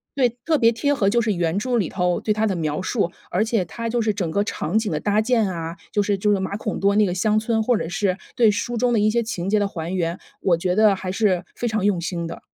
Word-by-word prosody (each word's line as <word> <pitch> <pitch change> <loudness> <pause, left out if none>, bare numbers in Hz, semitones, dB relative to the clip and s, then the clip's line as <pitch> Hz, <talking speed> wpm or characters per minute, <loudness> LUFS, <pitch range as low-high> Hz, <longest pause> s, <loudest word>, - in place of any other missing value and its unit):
对， 255 -3 +3 0.2
特 315 -2 +3
别 230 0 +5
贴 285 +5 0
合。 205 -8 +1
就 235 +2 +2
是 215 -2 +1
原 170 0 0
著 250 +3 -1
里 200 -7 +1
头 180 -2 0
对 215 - -2
他 220 +1 0
的 195 - -1
描 155 0 -2
述， 185 -3 0 0.2
而 185 +5 +2
且 225 -3 0
它 230 +6 -5
就 240 +1 0
是 215 - +1
整 185 -5 -2
个 200 +3 +1
场 215 - -2
景 215 -4 -2
的 150 - -1
搭 205 0 +1
建 225 -2 +2
啊， 165 -1 -5 0.2
就 205 -1 +1
是 205 0 +1
就 210 +2 +1
是 200 - +2
马 190 +1 -3
孔 215 - -4
多 200 +1 +2
那 215 - +5
个 180 - -1
乡 215 +3 +2
村， 220 0 0
或 245 +2 +2
者 165 - -4
是 185 0 0 0.2
对 235 -4 +5
书 235 +3 -3
中 245 +1 +2
的 220 - +3
一 210 +1 +3
些 235 +1 +1
情 195 -4 -4
节 215 - +3
的 205 - +1
还 170 0 -5
原， 170 0 -1 0.2
我 180 - +3
觉 180 +1 0
得 215 -1 +5
还 185 -1 -4
是 190 -3 +1
非 240 - -2
常 215 -3 -1
用 195 -4 +2
心 170 -1 -3
的。 170 - -7
205 Hz, 305 characters per minute, -22 LUFS, 180-225 Hz, 0.2 s, 别